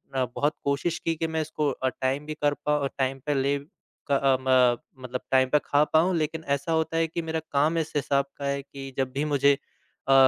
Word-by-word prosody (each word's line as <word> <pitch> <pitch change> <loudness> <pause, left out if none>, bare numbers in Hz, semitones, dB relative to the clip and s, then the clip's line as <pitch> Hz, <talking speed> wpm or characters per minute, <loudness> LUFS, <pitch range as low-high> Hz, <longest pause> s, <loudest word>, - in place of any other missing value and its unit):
अ, 130 - +2
बहुत 145 +2 +1
कोशिश 140 +4 0
की, 165 0 -1
कि 165 +1 -1
मैं 160 0 -1
इसको 150 -1 -1
अ, 130 0 -1
टाइम 135 +3 -2
भी 155 - -4
कर 145 0 +4
पाऊँ 150 -1 +2
अ, - - +2
टाइम 135 0 0
पे 150 - +1
ले 140 +1 +1 0.5
क - - +5
अ, 135 -1 +3
म 130 0 +2
मतलब 125 0 -4
टाइम 130 -1 +4
पे 150 - +4
खा 145 +1 +4
पाऊँ। 175 +3 +4
लेकिन 160 +1 -2
ऐसा 140 +4 -5
होता 160 0 +1
है 165 0 +2
कि 170 +1 -3
मेरा 160 0 -2
काम 150 +4 +2
इस 160 -1 -2
हिसाब 140 -1 +1
का 140 - -5
है 140 0 -1
कि 135 -1 -9
जब 130 -1 0
भी 145 +2 -1
मुझे 140 -1 +4 0.6
अ - - +7
140 Hz, 235 wpm, -26 LUFS, 135-155 Hz, 0.6 s, अ